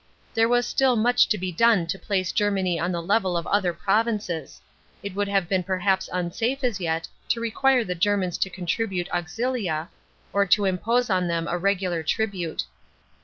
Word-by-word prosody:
There 225 0 +3
was 245 0 +1
*till 265 -2 +3
much 245 +2 +4
to 210 - +2
be 185 -1 -3
done 220 -1 +4
to 170 +4 -4
place 185 -2 -1
Germany 195 -5 +1
on 175 +2 -1
the 170 -1 -3
level 190 -1 +1
of 170 - -3
other 195 -3 +1
provinces; 205 - -1 0.4
it 200 -1 -5
would 205 +1 -1
have 195 -3 +1
been 190 +1 +1
perhaps 190 +1 0
unsafe 225 +10 -2
as 235 -5 0
yet 165 -2 -2 0.2
to 230 - 0
n 230 - -2
quire 265 0 +3
the 180 - -3
Germans 185 -1 0
to 190 - 0
contribute 185 +1 -2
aunfia, 175 -2 -2 0.4
or 200 0 +2
t<> 200 +2 +4
impose 230 +6 +1
on 185 -1 +2
them 165 -1 -1
a 175 - -1
regular 185 -3 0
tribute. 180 -1 -2
195 Hz, 180 wpm, -25 LUFS, 175-220 Hz, 0.4 s, much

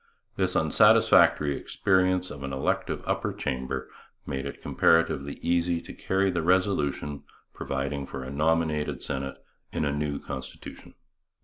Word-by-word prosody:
This - - 0
unsatisfactory 70 -2 +5
experience 95 0 +1
of 70 -1 -8
an 70 0 -4
elective 65 0 -1
upper - - -1
chamber 65 0 -3 0.4
made 70 -1 -3
it 70 - -8
comparatively 80 -4 +2
easy 85 0 +1
to - - -10
carry 95 0 0
the 85 -2 -1
resolution 80 -5 0 0.3
providing 70 +1 -3
for 70 -1 -6
a 65 - -7
nominated 75 +1 0
Senate 65 0 -4 0.3
in - - -2
the 70 - +1
new 75 0 -2
constitution. 65 -2 -9
75 Hz, 130 wpm, -27 LUFS, 70-85 Hz, 0.4 s, unsatisfactory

